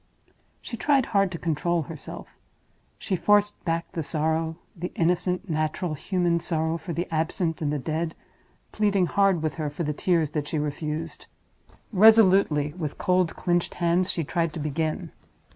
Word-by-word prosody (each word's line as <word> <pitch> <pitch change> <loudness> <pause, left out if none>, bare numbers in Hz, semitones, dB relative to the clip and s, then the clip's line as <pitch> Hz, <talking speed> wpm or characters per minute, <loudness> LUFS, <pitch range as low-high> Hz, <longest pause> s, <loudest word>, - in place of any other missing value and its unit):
She 235 - -6
tried 275 0 +3
hard 195 -2 +3
to 170 - -4
control 165 +1 0
herself; - - -9 0.7
she 190 - -2
forced 205 +3 +2
back 165 0 -1
the 165 - -3
sorrow—the 160 +3 -3
innocent, 180 +3 0
natural, 155 +1 -1
human 175 +2 0
sorrow 160 0 -1
for 175 - -6
the 170 +2 -2
absent 165 +1 -1
and 145 -2 0
the 150 - 0
dead—pleading 170 +6 -2
hard 195 -3 +2
with 155 - -2
her 150 - -1
for 145 +4 -4
the 150 -1 -1
tears 165 -1 +1
that 150 -2 -2
she 155 - -2
refused. 150 +2 -4 0.7
Resolutely, 190 -8 +5
with 155 -4 -5
cold, 180 -2 +1
clinched 175 -1 0
hands, 175 +2 +1
she 170 - -1
tried 165 +1 -1
to 165 - -5
begin. 155 +1 -2
170 Hz, 150 wpm, -26 LUFS, 155-185 Hz, 0.7 s, Resolutely